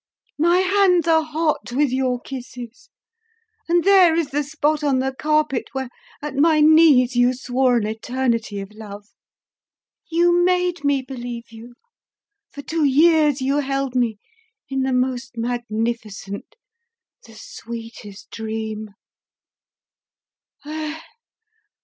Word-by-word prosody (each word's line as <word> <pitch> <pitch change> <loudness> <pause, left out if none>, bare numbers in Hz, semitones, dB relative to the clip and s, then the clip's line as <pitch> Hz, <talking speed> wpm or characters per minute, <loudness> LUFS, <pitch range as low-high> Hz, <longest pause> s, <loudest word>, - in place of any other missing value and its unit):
My 345 +3 +4
hands 375 -3 +3
are 320 -1 +4
hot 310 -4 -2
with 280 0 +1
your 255 -1 0
kisses, 255 - -9 0.8
and 345 0 +3
there 375 -4 +6
is 325 -4 -1
the 290 +2 0
spot 300 +1 -1
on 280 -3 +2
the 265 +1 -1
carpet 305 -2 0
where 265 -2 -4 0.3
at 295 - -4
my 310 +2 +4
knees 300 -5 +5
you 245 +1 +3
swore 250 0 +1
an 220 - -1
eternity 230 -1 -2
of 195 +2 -10
love! 205 -1 -11 1.0
You 345 +1 +3
made 360 -2 +1
me 280 -2 +1
believe 245 -3 -7
you; 230 +2 -13 0.8
for 285 - -9
two 320 +1 -1
years 295 -1 +4
you 275 +2 +1
held 275 -2 -2
me 235 -4 +1 0.5
in 270 -1 -1
the 265 0 0
most 250 -1 -2
magnificent, 230 -4 -4 0.7
the - - -15
sweetest 230 - -10
dream! 220 -2 -5
265 Hz, 120 wpm, -21 LUFS, 235-310 Hz, 1.0 s, there